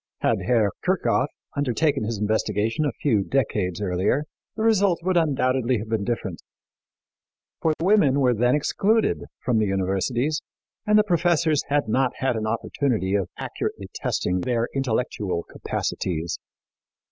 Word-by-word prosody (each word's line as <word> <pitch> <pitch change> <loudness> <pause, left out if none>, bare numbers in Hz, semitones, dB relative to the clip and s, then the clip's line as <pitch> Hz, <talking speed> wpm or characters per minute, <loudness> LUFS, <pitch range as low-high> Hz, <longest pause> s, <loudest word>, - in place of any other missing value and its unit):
Had - - +1
Herr 115 -5 +3
Kirchhoff 180 -7 +2 0.3
undertaken 145 -2 +1
his 115 0 -2
investigation 110 +5 0
a 145 - +1
few 110 -9 +3
decades 105 -8 -1
earlier, 100 +8 +1 0.3
the 220 - -2
result 200 -5 +3
would 185 0 +1
undoubtedly 130 -6 +2
have 110 +1 -6
been 110 -2 0
different, 100 -6 -3 1.2
for 160 - +2
women 165 -7 +4
were 125 -3 +4
then 120 +3 +2
excluded 210 +9 +1 0.2
from 120 -3 +2
the 105 - +2
universities 100 +10 0 0.5
and 210 0 +5
the 210 - +6
professors 170 -5 +2
had 145 -4 +1
not 130 +3 +1
had 130 -2 0
an 110 -1 -2
opportunity 115 -3 -1
of 100 -3 0
accurately - - -4
testing 90 +1 -1
their 120 +2 0
intellectual 110 -9 -1
capacities. 85 -2 -3
125 Hz, 135 wpm, -24 LUFS, 105-150 Hz, 1.2 s, the